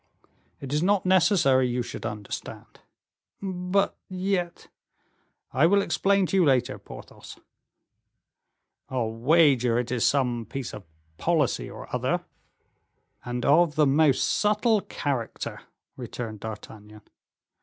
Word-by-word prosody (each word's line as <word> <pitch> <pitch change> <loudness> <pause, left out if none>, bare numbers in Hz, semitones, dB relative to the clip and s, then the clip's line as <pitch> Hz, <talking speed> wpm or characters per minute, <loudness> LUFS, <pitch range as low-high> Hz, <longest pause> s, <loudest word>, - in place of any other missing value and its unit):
"It 135 0 -6
is 150 - +1
not 200 +2 +2
necessary 175 -8 +4
you 125 0 -1
should 115 - -6
understand." 105 -2 -8 0.6
"But 190 0 -1
yet 185 -2 -2 0.4
" - - -43
"I 165 - +7
will 200 +2 +3
explain 200 -1 +2
to 195 - -1
you 185 - +5
later, 130 -6 +1
Porthos." - - -12 1.5
"I'll 120 -4 -1
wager 125 -1 +3
it 120 0 -2
is 125 -3 0
some 125 -5 +1
piece 135 -3 -5
of 105 -3 -9 0.3
policy 160 -7 0
or - - -10
other." - - -1 1.0
"And 125 0 -4
of 155 +1 +4
the 155 -1 +4
most 145 0 +3
subtle 215 +1 +2
character," 135 -10 -4 0.3
returned 110 -3 -6
D'Artagnan. 105 -1 -10
140 Hz, 120 wpm, -26 LUFS, 120-180 Hz, 1.5 s, I